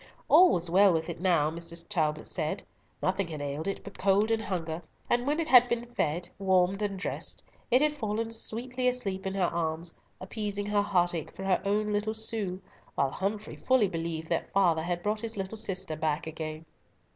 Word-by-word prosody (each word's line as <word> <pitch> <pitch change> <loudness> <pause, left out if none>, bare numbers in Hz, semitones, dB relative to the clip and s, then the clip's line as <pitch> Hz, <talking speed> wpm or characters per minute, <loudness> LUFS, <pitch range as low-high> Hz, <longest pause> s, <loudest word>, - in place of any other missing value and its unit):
All 365 0 +8
was 175 0 0
well 190 +3 +6
with 160 0 -1
it 170 - -6
now, 165 -5 +3
Mrs. 170 0 -6
Talbot 155 -6 0
said. - - -2 0.4
Nothing 185 0 +1
had 155 -3 -6
ailed 145 +3 -3
it 195 - -3
but 200 - -11
cold 200 +3 +3
and 225 -1 +2
hunger, 170 -5 -3 0.3
and 245 +2 +2
when 300 +3 +1
it 330 - -1
had 250 -4 +7
been 235 0 -1
fed, 175 -8 -1
warmed, 190 0 +2
and 200 -2 -1
dressed, 185 - -3 0.3
it 255 +4 +5
had 300 0 +3
fallen 225 -3 -2
sweetly 250 +3 -1
asleep 195 -6 -1
in 190 - -3
her 195 - +1
arms, 165 -1 -1 0.3
appeasing 205 +1 -3
her 205 0 +2
heartache 175 -5 0
for 190 - -7
her 190 -1 +2
own 210 +1 +1
little 215 +1 -1
Sue, 215 -4 -1 0.4
while 140 -1 +1
Humfrey 205 +5 -3
fully 255 -5 +3
believed 165 -2 -4
that - - -1
father 175 -5 +3
had 175 +1 -2
brought 210 +1 0
his 230 -2 -4
little 195 +2 -3
sister 190 -7 -2
back 155 -1 -1
again. 160 0 -6
195 Hz, 190 wpm, -29 LUFS, 170-215 Hz, 0.4 s, All